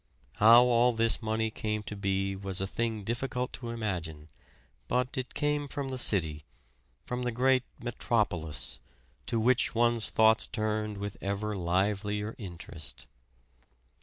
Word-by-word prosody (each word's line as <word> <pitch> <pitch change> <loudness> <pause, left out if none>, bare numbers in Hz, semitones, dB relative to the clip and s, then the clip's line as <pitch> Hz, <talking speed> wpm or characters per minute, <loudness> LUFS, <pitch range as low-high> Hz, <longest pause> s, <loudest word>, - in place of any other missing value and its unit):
How 115 +3 +8
all 125 0 +4
this 115 0 +2
money 110 0 -1
came 105 -1 -3
to 105 - -6
be 95 0 -1
was 95 -1 -4
a 95 - -1
thing 110 +1 -2
difficult 125 +3 -3
to 120 -2 -6
imagine; 85 -9 -4 0.6
but 125 - 0
it 130 -1 -4
came 145 -1 0
from 140 0 -4
the 130 - -3
city 80 -10 +2 0.6
from 125 0 -3
the 125 0 -1
great 130 +2 +3 0.2
Metropolis, 90 - -2 0.5
to 115 - 0
which 120 +2 +2
one's 120 -1 +3
thoughts 110 0 +4
turned 110 -1 -2
with 100 0 -5
ever 100 +2 -2
livelier 105 +4 -1
interest. 85 -5 -9
110 Hz, 135 wpm, -30 LUFS, 95-120 Hz, 0.6 s, How